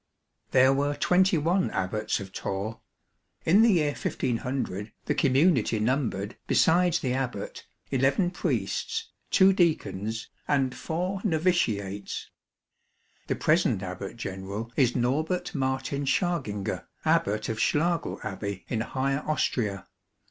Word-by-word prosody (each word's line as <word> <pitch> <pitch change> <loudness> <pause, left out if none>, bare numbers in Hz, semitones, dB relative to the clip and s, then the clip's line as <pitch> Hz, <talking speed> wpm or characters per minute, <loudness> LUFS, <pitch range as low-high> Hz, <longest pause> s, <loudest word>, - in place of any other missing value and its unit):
There 130 +1 +5
were 145 +1 0
twenty 180 +4 +3
one 175 +5 +1
Abbats 95 +3 -1
of 95 -1 -8
Torre. 100 +3 -4 0.6
In 190 +7 +6
the 225 -2 +6
year 150 -4 +2
1500 120 -6 -2
the - - +1
community 135 - +3
numbered, 110 -3 -1
besides 175 +1 +4
the 125 -2 -1
Abbat, 125 -6 -4 0.3
eleven 135 +7 +2
Priests, 450 - -2 0.2
two 195 0 +6
Deacons, 115 - 0 0.2
and 135 -3 +2
four 180 +7 -3
Novitiates. 125 - 0 1.0
The - - 0
present 95 - +2
Abbat 95 +4 -6
General 100 +2 -5
is 125 -3 +3
Norbert 150 +9 0
Martin 135 0 -1
Schaginger, 135 - -1 0.2
Abbat 105 +2 +2
of 110 -1 -3
Schlagl 165 +7 +1
Abbey, 100 -2 -5
in 115 -3 -1
Higher 135 +4 -1
Austria. 110 - 0
130 Hz, 115 wpm, -27 LUFS, 105-160 Hz, 1.0 s, In